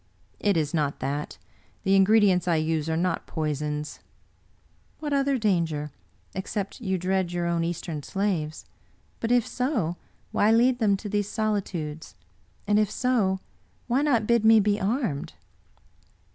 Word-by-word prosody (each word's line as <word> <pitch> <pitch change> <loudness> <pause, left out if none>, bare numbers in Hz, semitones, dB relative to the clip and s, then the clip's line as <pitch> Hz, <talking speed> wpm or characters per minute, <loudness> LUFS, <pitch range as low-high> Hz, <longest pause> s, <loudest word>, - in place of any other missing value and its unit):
" - - -37
It 195 - +3
is 150 -2 0
not 150 -3 0
that. 140 +3 -3 0.5
The 195 0 +3
ingredients 195 -2 +4
I 170 - +3
use 155 0 0
are 160 - 0
not 180 +1 -1
poisons." 150 -1 -3 0.5
" - - -37
What 295 -2 -3
other 275 -1 +2
danger, 165 - 0 0.4
except 195 +3 -4
you 190 -4 0
dread 185 0 0
your 175 -1 -1
own 170 -1 0
East 170 +2 -3
em 155 -3 -4
slaves? 175 -4 -2 0.5
But, 230 - -1
if 245 -2 +4
so, 235 - -1 0.3
why 210 - +3
lead 245 +2 +4
them 205 -4 +3
to 210 - -7
these 205 0 -1
solitudes; 185 - -3 0.5
and, 205 +1 +3
if 210 -2 +2
so, 210 -7 +1 0.4
why 250 +3 +1
not 250 -7 +2
bid 235 0 +3
me 220 0 +7
be 205 0 +1
armed? 205 - -1
190 Hz, 155 wpm, -26 LUFS, 160-220 Hz, 0.5 s, me